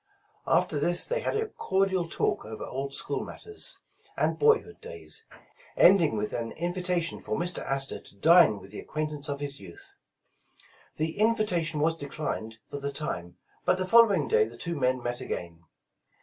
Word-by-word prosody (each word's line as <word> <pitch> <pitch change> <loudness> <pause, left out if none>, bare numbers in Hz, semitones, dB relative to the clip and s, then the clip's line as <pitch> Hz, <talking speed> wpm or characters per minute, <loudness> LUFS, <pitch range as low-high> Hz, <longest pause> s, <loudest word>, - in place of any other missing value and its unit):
After 150 - +2
this 175 +4 +2
they - - 0
had 485 - -1
a 440 0 -1
cordial 190 - 0
talk - - 0
over 110 0 -7
old 135 +1 -4
school - - -1
matters, 430 -1 -3 0.4
and - - 0
boyhood 450 0 +3
days, 450 -1 -3 0.5
ending 170 - +6
with 105 0 -2
an 115 -1 -3
invitation 175 0 -1
for - - -3
Mr. 175 +1 -1
Astor 135 0 -1
to - - -15
dine 160 - +6
with 95 +1 -13
the 105 - -7
acquaintance 150 -1 -4
of 140 0 -3
his 140 -1 -4
youth. 85 -3 -12 1.0
The 160 +4 -2
invitation 185 -9 +2
was 165 +1 +2
declined 140 -7 -5
for 145 - -6
the 140 0 -3
time, 85 - -5 0.3
but - - +3
the 185 - -1
following 200 - +5
day 105 - +4
the 115 +1 -10
two 170 +6 -2
men 130 -3 0
met 120 0 -2
again. 85 -1 -6
155 Hz, 165 wpm, -28 LUFS, 125-185 Hz, 1.0 s, ending